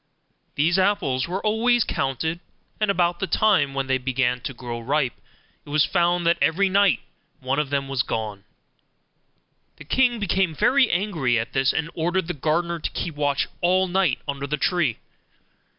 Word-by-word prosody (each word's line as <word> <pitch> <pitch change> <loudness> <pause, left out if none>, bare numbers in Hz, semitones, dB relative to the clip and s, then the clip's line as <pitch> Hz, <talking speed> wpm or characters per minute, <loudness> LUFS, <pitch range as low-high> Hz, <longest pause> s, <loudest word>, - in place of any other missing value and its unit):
These 165 +6 +2
apples 185 -10 +1
were 185 +4 -4
always 235 +2 +3
counted, 160 +5 -2 0.4
and 215 -1 +1
about 175 -3 +1
the 190 - -2
time 155 -13 +2
when 135 0 -1
they 130 0 0
began 125 -1 0
to 140 - -4
grow 120 -2 -6
ripe 130 +1 0 0.5
it - - -15
was 150 0 +3
found 175 -1 +1
that 170 +1 +3
every 195 +4 +2
night 200 0 +3 0.4
one 135 +1 -1
of 150 -2 -1
them 140 -1 -1
was 135 -2 0
gone. 105 -4 -4 1.3
The 155 - -12
king 245 - +2
became 190 -4 0
very 250 - +3
angry 170 - 0
at 115 - -3
this, 135 0 +2
and 160 +1 -3
ordered 175 +3 -1
the 175 - -2
gardener 170 +3 -1
to - - -3
keep 170 - -4
watch 145 -1 0
all 185 +2 +3
night 185 -6 +1
under 140 0 -3
the 150 +2 -1
tree. 155 - 0
160 Hz, 170 wpm, -23 LUFS, 135-190 Hz, 1.3 s, always